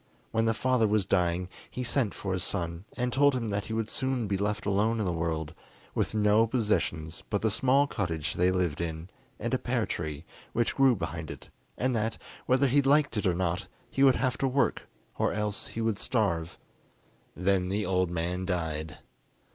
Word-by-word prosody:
When 115 Hz, 0 st, +2 dB
the 115 Hz, 0 st, +2 dB
father 125 Hz, -2 st, +2 dB
was 105 Hz, -2 st, +2 dB
dying, 90 Hz, -1 st, +1 dB, 0.2 s
he 125 Hz, -, -4 dB
sent 120 Hz, -3 st, 0 dB
for 95 Hz, -2 st, -3 dB
his 95 Hz, -1 st, -1 dB
son 85 Hz, -1 st, -2 dB
and 125 Hz, 0 st, -1 dB
told 145 Hz, +1 st, +4 dB
him 115 Hz, -4 st, -2 dB
that 100 Hz, 0 st, -1 dB
he 110 Hz, -, -5 dB
would 110 Hz, -1 st, -1 dB
soon 130 Hz, 0 st, -1 dB
be 100 Hz, -, 0 dB
left 105 Hz, +1 st, -1 dB
alone 105 Hz, +3 st, +2 dB
in 105 Hz, -, 0 dB
the 90 Hz, -, +1 dB
world, 80 Hz, -2 st, -2 dB, 0.4 s
with -, -, -1 dB
no 105 Hz, +1 st, +4 dB
possessions 105 Hz, -9 st, -1 dB
but 105 Hz, -, -1 dB
the 110 Hz, -, +3 dB
small 135 Hz, +5 st, +3 dB
cottage 80 Hz, -, -2 dB
they 90 Hz, +1 st, +3 dB
lived 90 Hz, -4 st, 0 dB
in 80 Hz, +1 st, -4 dB, 0.3 s
and -, -, -2 dB
a -, -, +2 dB
pear -, -, 0 dB
tree 80 Hz, -1 st, -4 dB, 0.3 s
which 120 Hz, 0 st, +1 dB
grew 135 Hz, -2 st, +5 dB
behind 80 Hz, -4 st, -4 dB
it, -, -, -9 dB, 0.3 s
and 130 Hz, 0 st, +1 dB
that, 110 Hz, 0 st, -1 dB, 0.3 s
whether 130 Hz, +2 st, +4 dB
he 140 Hz, +2 st, +4 dB
liked 145 Hz, 0 st, +3 dB
it 105 Hz, -2 st, +1 dB
or 90 Hz, -, +2 dB
not, 90 Hz, +2 st, -1 dB, 0.2 s
he 135 Hz, -, -1 dB
would 135 Hz, -2 st, +7 dB
have 130 Hz, -1 st, 0 dB
to 135 Hz, -, +2 dB
work, 135 Hz, 0 st, +1 dB, 0.3 s
or -, -, +2 dB
else 105 Hz, -1 st, -2 dB
he 115 Hz, -, -5 dB
would 110 Hz, -3 st, 0 dB
starve. 85 Hz, -9 st, 0 dB, 0.8 s
Then 90 Hz, 0 st, +1 dB
the 105 Hz, +2 st, 0 dB
old 90 Hz, -1 st, +1 dB
man 90 Hz, +2 st, -2 dB
died. 80 Hz, -4 st, -2 dB
100 Hz, 195 wpm, -29 LUFS, 85-120 Hz, 0.8 s, would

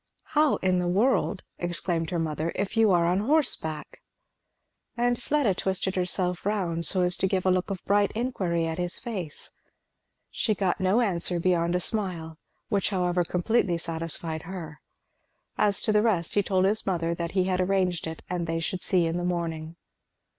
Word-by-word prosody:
"How 300 Hz, -1 st, +4 dB
in 185 Hz, -1 st, +3 dB
the 180 Hz, -, -1 dB
world," 205 Hz, +1 st, +1 dB, 0.2 s
exclaimed 175 Hz, -1 st, -2 dB
his 175 Hz, -, -1 dB
mother, 160 Hz, 0 st, -2 dB
"if 195 Hz, +3 st, -2 dB
you 225 Hz, -1 st, +5 dB
are 175 Hz, -3 st, +4 dB
on 180 Hz, +3 st, +2 dB
horseback?" 215 Hz, -, 0 dB, 1.0 s
And 245 Hz, 0 st, +1 dB
Fleda 280 Hz, -7 st, +1 dB
twisted 190 Hz, +1 st, -1 dB
herself 180 Hz, -1 st, 0 dB
round 175 Hz, -6 st, -1 dB
so 185 Hz, -2 st, +2 dB
as 180 Hz, 0 st, +1 dB
to 190 Hz, -, +1 dB
give 190 Hz, -1 st, -1 dB
a 185 Hz, -, +4 dB
look 185 Hz, +1 st, 0 dB
of 190 Hz, -3 st, -5 dB
bright 205 Hz, 0 st, +3 dB
inquiry 190 Hz, -9 st, -1 dB
at 165 Hz, +1 st, -3 dB
his 175 Hz, 0 st, 0 dB
face. 190 Hz, -, -5 dB, 0.8 s
She 215 Hz, -, 0 dB
got 190 Hz, -2 st, 0 dB
no 190 Hz, +6 st, +3 dB
answer 180 Hz, -5 st, +2 dB
beyond 170 Hz, -1 st, +1 dB
a -, -, +2 dB
smile, 170 Hz, -4 st, -2 dB, 0.3 s
which 200 Hz, -3 st, 0 dB
however 180 Hz, -2 st, +1 dB
completely 180 Hz, +1 st, +1 dB
satisfied 165 Hz, -1 st, -3 dB
her. 165 Hz, -4 st, -8 dB, 0.7 s
As 205 Hz, -2 st, +3 dB
to -, -, +2 dB
the 210 Hz, 0 st, +4 dB
rest 195 Hz, -7 st, +1 dB
he 205 Hz, -, +3 dB
told 190 Hz, -1 st, +1 dB
his 210 Hz, +2 st, 0 dB
mother 170 Hz, -3 st, 0 dB
that 170 Hz, 0 st, -4 dB
he 190 Hz, -2 st, +3 dB
had 185 Hz, 0 st, 0 dB
arranged 185 Hz, -3 st, 0 dB
it 160 Hz, 0 st, -7 dB
and 175 Hz, -2 st, -3 dB
they 165 Hz, 0 st, -1 dB
should 175 Hz, +3 st, -2 dB
see 180 Hz, -3 st, +3 dB
in 165 Hz, +1 st, -1 dB
the 175 Hz, -, -2 dB
morning. 165 Hz, -2 st, -3 dB
180 Hz, 180 wpm, -27 LUFS, 170-200 Hz, 1.0 s, you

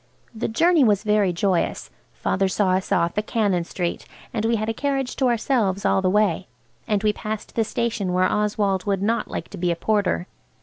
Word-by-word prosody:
The 220 Hz, -, -2 dB
journey 330 Hz, +7 st, +3 dB
was 210 Hz, -4 st, +3 dB
very 210 Hz, -3 st, +2 dB
joyous. 175 Hz, 0 st, -1 dB, 0.2 s
Father 195 Hz, 0 st, 0 dB
saw 190 Hz, 0 st, +1 dB
us 185 Hz, +1 st, -1 dB
off 170 Hz, 0 st, +1 dB
at 210 Hz, -, -5 dB
Cannon 200 Hz, -6 st, +1 dB
Street, 175 Hz, 0 st, -4 dB, 0.3 s
and 220 Hz, -3 st, -1 dB
we 230 Hz, +1 st, +2 dB
had 215 Hz, 0 st, -2 dB
a 225 Hz, -, 0 dB
carriage 270 Hz, 0 st, -2 dB
to 265 Hz, -, +2 dB
ourselves 225 Hz, -5 st, +1 dB
all -, -, +3 dB
the 185 Hz, -, +2 dB
way, 195 Hz, -3 st, +1 dB, 0.4 s
and 210 Hz, -2 st, 0 dB
we 210 Hz, -1 st, +3 dB
passed 215 Hz, 0 st, -5 dB
the 225 Hz, -, +1 dB
station 220 Hz, -3 st, -2 dB
where 180 Hz, +1 st, +2 dB
Oswald 205 Hz, -2 st, 0 dB
would 195 Hz, -1 st, 0 dB
not 230 Hz, +3 st, 0 dB
like -, -, -5 dB
to 195 Hz, -, -9 dB
be 175 Hz, 0 st, 0 dB
a 170 Hz, -, +1 dB
porter. 205 Hz, -1 st, 0 dB
210 Hz, 205 wpm, -23 LUFS, 190-225 Hz, 0.4 s, journey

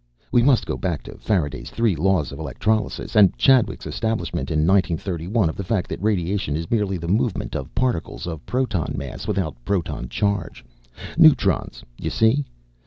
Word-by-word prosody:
"We 120 Hz, -, +5 dB
must 130 Hz, 0 st, +4 dB
go -, -, -3 dB
back 85 Hz, -6 st, -2 dB
to -, -, -11 dB
Faraday's 85 Hz, -10 st, -1 dB
three 115 Hz, -5 st, +1 dB
laws 85 Hz, -3 st, +1 dB
of 70 Hz, -, -8 dB
electrolysis 110 Hz, +2 st, -2 dB
and 100 Hz, -4 st, +6 dB
Chadwick's 130 Hz, -4 st, +3 dB
establishment 110 Hz, -11 st, -2 dB
in 75 Hz, -1 st, +1 dB
nineteen 95 Hz, -2 st, +3 dB
thirty 85 Hz, -1 st, -5 dB
one 105 Hz, -2 st, +2 dB
of 80 Hz, -, -3 dB
the 100 Hz, -, -4 dB
fact 95 Hz, -1 st, -1 dB
that -, -, -5 dB
radiation 95 Hz, -6 st, 0 dB
is 80 Hz, +1 st, -4 dB
merely 105 Hz, -4 st, +1 dB
the 85 Hz, 0 st, -6 dB
movement 105 Hz, +3 st, 0 dB
of -, -, -5 dB
particles 125 Hz, -9 st, -1 dB
of 80 Hz, -3 st, -6 dB
proton 120 Hz, -, -1 dB
mass -, -, -6 dB
without 90 Hz, -, -2 dB
proton 85 Hz, -9 st, -2 dB
charge. 100 Hz, -5 st, -2 dB, 0.5 s
Neutrons, -, -, +4 dB, 0.2 s
you -, -, -2 dB
see. 120 Hz, +6 st, +2 dB
95 Hz, 175 wpm, -22 LUFS, 85-110 Hz, 0.5 s, and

